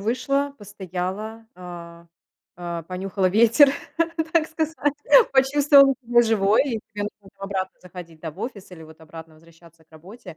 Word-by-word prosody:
вышла, 275 +6 -1
постояла, 205 +2 -6
а, 170 -1 -11 0.5
а, 170 -1 -6
понюхала 185 +2 -2
ветер, 230 +8 +5 0.6
так 330 -2 +2
сказать, 320 0 -3 0.6
почувствовала 275 +1 +5
себя 240 0 +4
живой, 215 -2 +2
и 235 -6 -3
тебе 205 - -3
нужно 205 -1 -10
там 195 - -17
обратно 190 -1 -4
заходить, 175 -3 -12
да, 160 - -6
в 150 - -20
офис 205 -7 -7
или 170 -3 -12
вот 160 0 -17
обратно 160 0 -12
возвращаться 165 0 -21
к - - -52
работе. 170 +3 -13
195 Hz, 150 wpm, -23 LUFS, 170-240 Hz, 0.6 s, ветер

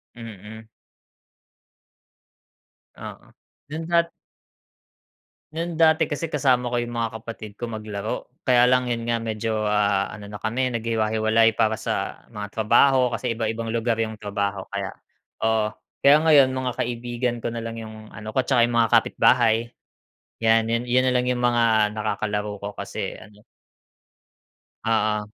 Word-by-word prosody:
Mm. 110 -1 -10 2.3
Oo. - - -10 0.4
Dun 160 +2 -5
dat 170 0 +2 1.4
No'n 165 0 -3
dati 160 -1 +4
kasi 155 +2 -4
kasama 130 -4 +2
ko 120 - +1
'yung 120 - -4
mga 115 0 -1
kapatid 110 -3 -8
ko 120 +2 -6
maglaro. 110 -1 -5 0.2
Kaya 125 -2 +4
lang 125 0 +2
'yun 115 -1 -2
nga 115 -1 0
medyo, 110 -1 -2
ah, 100 -2 +1
ano 105 -1 -9
na 105 0 -9
kami 125 +3 -1
naghiwa-hiwalay 110 0 +2
para 110 0 +1
sa - - -4
mga 105 -1 -6
trabaho, 125 +3 +3
kasi 115 -1 -2
iba-ibang 115 0 -2
lugar 115 0 0
'yung 110 -1 -3
trabaho 100 -2 -3
kaya 100 -1 -2 0.6
oo. 110 -1 +2 0.3
Kaya 140 +1 +7
ngayon, 145 -4 +6
mga 130 -1 -1
kaibigan 120 +1 -2
ko 115 0 -4
nalang 115 0 -5
'yung 110 -1 -9
ano 110 0 -8
ko, 130 - +3
tsaka 125 -3 +3
'yung 120 - -3
mga 115 - +2
kapitbahay. 115 0 +3 0.8
'Yan 115 0 +4
'yun 115 +1 0
'yun 125 +1 +2
nalang 125 -1 +2
'yung 125 -1 0
mga 115 -3 +2
nakakalaro 105 -1 -2
ko 100 - -4
kasi - - -5
ano 105 0 -15 1.5
Oo. 110 -2 +1
115 Hz, 140 wpm, -24 LUFS, 110-125 Hz, 2.3 s, Kaya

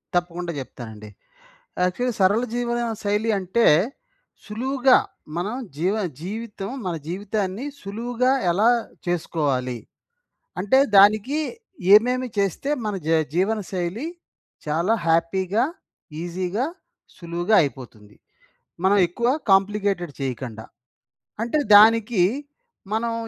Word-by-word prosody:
తప్పకుండా 175 0 -1
చెప్తానండి. 110 -5 -9 0.7
యాక్చువల్లీ 235 +7 0
సరళ 200 +5 +4
జీవనశైలి 230 -3 -1
అంటే, 195 +5 +1 0.8
సులువుగా 255 +4 +3 0.4
మనం 190 +6 -2 0.2
జీవ 185 +5 +1 0.3
జీవితం 205 +2 -6 0.2
మన 175 - -1
జీవితాన్ని, 200 +4 -3 0.2
సులువుగా 240 +5 -1 0.2
ఎలా 210 +6 +3 0.4
చేసుకోవాలి. 140 -8 -1 0.8
అంటే, 235 +8 +4 0.2
దానికి 215 +9 +5 0.6
ఏమేమి 250 +3 +3
చేస్తే, 200 - -1 0.2
మన 210 - -2
జీ 165 0 +4 0.2
జీవనశైలి 195 - -1 0.6
చాలా 170 +8 +1
హ్యాపీగా, 185 +7 +1 0.6
ఈజీగా 180 +7 -2 0.5
సులువుగా 175 +4 0
అయిపోతుంది. 115 -8 -6 0.7
మనం 195 +2 +4
ఎక్కువ 235 +8 -1 0.2
కాంప్లికేటెడ్ 195 -3 +2
చేయకండా. 125 -4 -5 0.8
అంటే 240 +6 0 0.2
దానికి 220 -1 +5 0.7
మనం 230 +1 0
195 Hz, 90 wpm, -23 LUFS, 170-225 Hz, 0.8 s, దానికి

